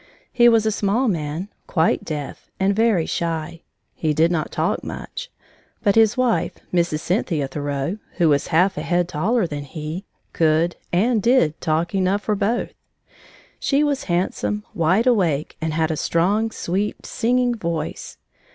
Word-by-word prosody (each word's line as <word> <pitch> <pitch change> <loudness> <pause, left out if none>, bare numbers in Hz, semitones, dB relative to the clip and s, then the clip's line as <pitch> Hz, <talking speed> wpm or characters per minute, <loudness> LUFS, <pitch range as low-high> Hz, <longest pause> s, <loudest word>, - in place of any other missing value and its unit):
He 240 -1 +6
was 225 -2 +3
a 220 - +2
small 210 +5 +1
man, 165 -1 -2 0.2
quite 160 -2 +1
deaf, 150 -3 -6
and 195 +1 +2
very 220 -7 +3
shy. 165 -1 -3 0.3
He 155 -2 -1
did 165 +3 +3
not 160 -3 -1
talk - - -1
much. - - -7 0.5
But 200 - +4
his 225 +1 +4
wife, 250 -2 +1 0.2
Mrs. 170 -3 +1
Cynthia 170 - 0
Thoreau, 145 +6 -3
who 175 -3 +2
was 145 -2 +2
half 180 +1 +2
a - - -3
head 175 +2 +1
taller 190 +7 +1
than 145 -3 -5
he, 155 +6 -6 0.3
could, 165 +1 +2 0.2
and 220 +5 +2
did, 195 - +2
talk 165 +2 0
enough 195 +1 +1
for 215 - 0
both. 210 +4 -1 0.9
She 280 +1 +2
was 285 -2 0
handsome, 185 +3 -1
wide 180 +8 +2
awake, 175 - +1
and 160 0 -1
had 160 0 0
a - - -1
strong, 200 +9 +1
sweet, 200 0 -3
singing 245 +1 +1
voice. 170 -8 -4
175 Hz, 155 wpm, -22 LUFS, 160-215 Hz, 0.9 s, He